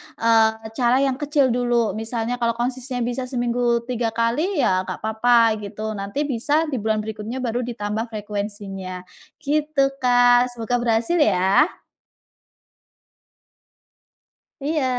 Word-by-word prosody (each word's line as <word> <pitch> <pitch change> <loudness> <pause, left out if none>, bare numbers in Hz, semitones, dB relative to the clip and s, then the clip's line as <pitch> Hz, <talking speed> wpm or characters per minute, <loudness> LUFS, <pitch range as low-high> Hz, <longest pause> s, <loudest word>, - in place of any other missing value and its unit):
eee, 220 -1 +2
cara 245 0 +3
yang 265 -1 0
kecil 290 -3 +2
dulu, 240 -2 +1
misalnya 225 +2 -3
kalau 235 -1 0
konsistennya 250 +1 -3
bisa 245 +2 -3
seminggu 240 -1 0
3 235 -2 -2
kali 280 - 0
ya 185 0 +1
nggak - - -5
apa-apa 225 0 +3
gitu, 215 +1 -5
nanti 200 +9 -2
bisa 280 0 -2 0.2
di 260 - -1
bulan 215 0 0
berikutnya 220 +4 -5
baru 240 0 -1
ditambah 220 -1 -3
frekuensinya, 200 -3 -6 0.4
gitu 295 -1 +1
Kak, 245 0 +4
semoga 230 +1 -2
berhasil 235 +8 +1
ya. 200 - +4 3.0
Iya, 305 -1 0
235 Hz, 120 wpm, -22 LUFS, 220-250 Hz, 3.0 s, Kak